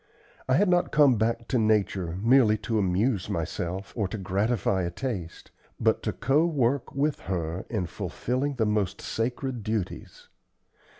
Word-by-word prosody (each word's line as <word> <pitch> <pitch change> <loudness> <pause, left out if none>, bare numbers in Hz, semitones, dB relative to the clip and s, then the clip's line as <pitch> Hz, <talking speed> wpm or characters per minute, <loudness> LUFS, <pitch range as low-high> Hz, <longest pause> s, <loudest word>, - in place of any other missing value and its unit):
I 130 - +4
had 200 +6 +4
not 175 -1 +2
come 145 -4 +5
back 115 +1 0
to 125 - +2
Nature 100 -5 +1
merely 115 -1 +5
to 115 -2 +1
amuse 100 +2 +1
myself 90 +1 -3
or 105 -5 0
to 100 - -5
gratify 100 0 0
a 85 - -1
taste, 90 -4 -5 0.3
but - - +2
to - - -1
co 140 +4 +2
work 140 -6 0
with 145 +1 0
her 85 -1 -3
in 105 -6 -1
fulfilling 130 - -3
the 115 -3 +1
most 105 -3 0
sacred 125 +2 -3
duties. 105 -3 -4
110 Hz, 155 wpm, -27 LUFS, 95-130 Hz, 0.3 s, come